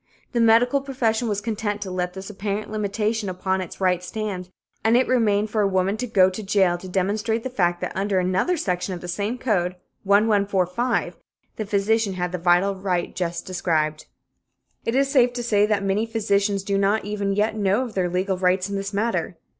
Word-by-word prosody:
The 240 - 0
medical 235 +4 +4
profession 245 -4 0
was 205 -2 -1
content 210 -1 -2
to 190 - -6
let 180 -1 -2
this 195 +2 -7
apparent 205 +1 -4
limitation 210 0 -1
upon 190 +1 -1
its 180 - -8
rights 180 -1 +1
stand, 200 -5 -4 0.3
and 225 +2 +4
it 255 - +2
remained 215 -4 +2
for 215 - +1
a 200 - +3
woman 190 +1 +1
to 250 +2 -3
go 195 -5 +5
to 185 - -6
jail 190 -3 +2
to 185 - -9
demonstrate 215 +5 0
the 260 - -4
fact 175 -7 +1
that - - -2
under 195 0 0
another 185 - +1
section 185 - -2
of 175 - -9
the 175 - -7
same 205 +7 -2
code 185 -8 0 0.3
1145 200 +2 +1 0.4
the 215 - -4
physician 205 +1 +1
had 180 -1 -2
the 180 - -3
vital 180 +3 +3
right 190 -2 -2
just 175 -1 -3
described. 155 -4 -1 0.8
It 230 - 0
is 275 +1 +3
safe 250 -3 +3
to 245 -1 -4
say 210 -3 +3
that 210 -2 0
many 200 +3 0
physicians 205 -3 0
do 195 0 0
not 200 +1 +1
even 205 -1 -1
yet 210 +2 +1
know 205 +3 +1
of 240 -4 -7
their 185 -2 0
legal 185 +1 -1
rights 185 +1 +1
in - - -2
this 195 +1 -4
matter. 225 +3 -1
200 Hz, 200 wpm, -23 LUFS, 185-220 Hz, 0.8 s, go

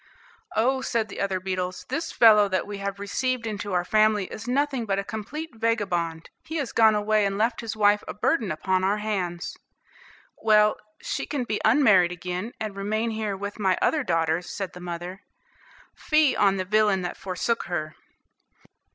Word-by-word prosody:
"Oh," 260 +4 +2
said 230 -4 -1
the - - -6
other 195 -1 0
beetles, 185 -1 -3
"this 300 +6 -2
fellow 215 -3 +6
that 185 -1 0
we 205 -1 -6
have 200 0 -4
received 250 +4 -2
into 205 -2 -4
our 175 -1 +1
family 215 0 +3
is 215 +3 -7
nothing 265 -2 0
but 195 -1 0
a 200 - -1
complete 275 +11 -6
vagabond. 190 -8 -1
He 320 - -7
has 285 -6 -2
gone 220 -1 +5
away 210 0 +2
and 195 0 0
left 230 +3 0
his 225 -1 -5
wife 205 -1 +3
a - - -4
burden 215 - 0
upon 185 +4 0
our 200 +2 +2
hands." 190 -5 -3 0.9
"Well, 215 -1 +4 0.3
she - - -3
can 285 -4 -2
be 215 -3 -3
unmarried 215 -8 +5
again, 180 +5 -5
and 215 -2 -4
remain 215 +3 -1
here 215 -3 -3
with 205 +2 -6
my 190 -3 +2
other 305 -3 +1
daughters," 165 -2 0
said 195 -2 -5
the 180 - -10
mother. 175 +2 -6 0.7
"Fie 305 -3 +2
on 195 -1 +3
the 185 - -2
villain 205 -1 +2
that 175 - -4
forsook 195 +5 -2
her!" 155 -3 -4
210 Hz, 175 wpm, -25 LUFS, 185-225 Hz, 0.9 s, fellow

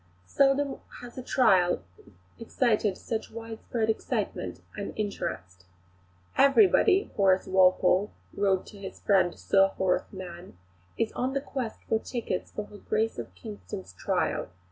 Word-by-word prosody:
Seldom 275 - +2 0.2
has 245 -1 -10
a 255 - -5
trial 185 - +3 0.6
excited 220 -4 +1
such 225 -1 -4
widespread 225 0 -4
excitement 220 - -2
and - - -5
interest. 90 - -4 0.7
"Everybody," 385 +6 +5
Horace 190 -2 +3
Walpole 185 +1 +4 0.2
wrote 195 -2 +1
to 205 - -13
his 195 -1 -8
friend 190 -3 +2
Sir 195 0 +4
Horace 185 -1 0
Mann, 180 - -9 0.4
"is 225 - 0
on 255 +2 -2
the 275 - +1
quest 260 -5 -5
for 220 - +2
tickets 225 -6 -4
for 210 - -5
her 205 - -13
Grace 220 - -1
of 105 -6 -7
Kingston's 90 -1 -8
trial. - - -1
205 Hz, 130 wpm, -28 LUFS, 185-235 Hz, 0.7 s, Everybody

